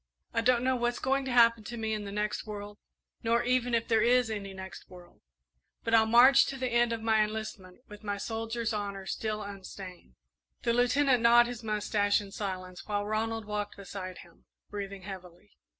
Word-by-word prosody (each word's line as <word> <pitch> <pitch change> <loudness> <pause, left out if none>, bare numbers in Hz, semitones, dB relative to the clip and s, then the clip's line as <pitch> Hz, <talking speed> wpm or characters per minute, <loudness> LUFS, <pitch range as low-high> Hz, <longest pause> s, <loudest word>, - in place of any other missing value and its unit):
I 230 - +1
don't 245 +1 +3
know 260 0 +2
what's 240 0 0
going 270 +1 0
to 260 - -3
happen 230 -2 +5
to 240 +1 -6
me 220 -1 -2
in 210 -1 -3
the 200 - -6
next 210 +1 -2
world, 205 0 -7 0.4
nor 230 +1 +2
even 245 -1 +1
if 230 - 0
there 225 -2 +3
is 245 0 +3
any 200 -2 -4
next 190 -1 -10
world; 180 -1 -15 0.6
but 230 - -2
I'll 220 -1 +6
march 250 +4 +7
to 270 - -4
the 255 -1 -2
end 240 0 +3
of 225 -1 -3
my 220 -1 +4
enlistment 210 -2 -6
with 210 +1 -12
my 205 -1 -2
soldier's 225 +2 -3
honour 200 -2 -4
still 215 +1 -3
unstained." 195 -2 -10 0.5
The 235 - +2
Lieutenant 250 +1 +3
gnawed 235 +1 +7
his 240 -1 -6
mustache 210 -1 +1
in 200 -2 -9
silence 185 -3 -6
while 205 -1 -1
Ronald 220 +1 -2
walked 210 0 -4
beside 190 -2 -7
him, 170 - -16 0.3
breathing 200 -2 -6
heavily. 180 - -10
220 Hz, 190 wpm, -30 LUFS, 200-235 Hz, 0.6 s, march